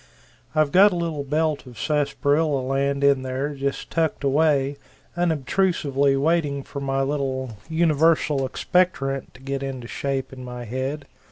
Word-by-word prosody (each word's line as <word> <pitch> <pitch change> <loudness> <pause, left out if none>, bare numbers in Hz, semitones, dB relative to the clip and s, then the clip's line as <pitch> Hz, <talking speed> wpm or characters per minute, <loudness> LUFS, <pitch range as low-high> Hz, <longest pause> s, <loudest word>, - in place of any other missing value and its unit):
I've 155 -2 +3
got 200 +3 +7
a - - -2
little 165 -4 -2
belt 150 0 -1
of 120 -3 -12
sassparilla 145 0 +1
land 140 +1 0
in 140 -1 +4
there 130 +3 -3
just 140 0 -3
tucked 160 -4 0
away 140 -1 +2 0.4
unobstrusively 150 -4 +1
waiting 145 -2 +1
for 140 - -7
my 135 0 0
little 130 -4 -2
Universal 155 -4 +2
Expectorant 135 -8 0
to 130 - -15
get 135 0 -3
into 130 -3 -5
shape 135 +1 -3
in 130 -1 -9
my 125 -1 -7
head. 130 +5 -3
140 Hz, 145 wpm, -23 LUFS, 135-155 Hz, 0.4 s, got